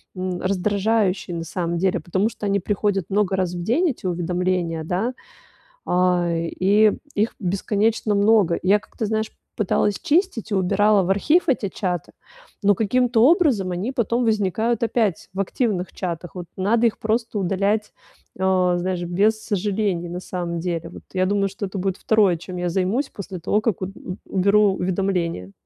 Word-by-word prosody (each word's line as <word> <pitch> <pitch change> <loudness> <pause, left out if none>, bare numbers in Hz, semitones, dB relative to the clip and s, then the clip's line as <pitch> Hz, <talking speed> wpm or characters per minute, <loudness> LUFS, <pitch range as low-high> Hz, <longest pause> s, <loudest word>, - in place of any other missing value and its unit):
м, 185 -1 -3
раздражающие, 200 -1 0
на 165 - -4
самом 170 +1 -2
деле, 185 +1 +1
потому 190 +4 0
что 215 - -7
они 200 0 +1
приходят 200 -1 0
много 195 -1 +1
раз 180 -2 0
в 175 - -4
день, 310 - +2
эти 230 - -11
уведомления, 175 -1 -1
да, 190 +10 -1 0.8
а, 180 -1 +2
и 195 +6 +3 0.2
их 215 +3 0
бесконечно 210 +3 0
много. 200 -4 +4
И 185 - -4
я 205 +1 +5
как-то, 220 - -5
знаешь, 220 0 -1 0.3
пыталась 205 0 +1
чистить 330 - 0
и - - 0
убирала 200 +2 +3
в - - -3
архив 305 - +3
эти 235 -7 +1
чаты, 180 -5 -3 0.5
но 205 0 +5
каким-то 235 +3 +2
образом 280 - +3
они 180 +7 -2
потом 235 0 0
возникают 220 +2 0
опять 225 -5 0
в 195 - -2
активных 195 -2 -1
чатах, 175 -2 -5
вот 180 -1 -6
надо 225 +5 +2
их 220 - -7
просто 225 0 -1
удалять, 200 +3 0 0.5
э, 190 - -5 0.4
знаешь, 180 0 -2
без 205 +6 +1
сожалений, 200 -3 -1
на 175 +1 -5
самом 175 -2 -4
деле. 165 -1 -3
Вот - - -11
я 185 0 +2
думаю, 200 0 +1
что 195 +1 -5
это 195 +1 -6
будет 190 0 -1
2 205 -6 +3
чем 180 +2 -8
я 175 0 -1
займусь 195 - 0
после 190 -2 -7
того, 210 +5 +1
как 220 -6 0
от 185 - -2
у 180 - -7
уберу 200 +1 +3
уведомления. 180 - -1
195 Hz, 170 wpm, -22 LUFS, 180-215 Hz, 0.8 s, я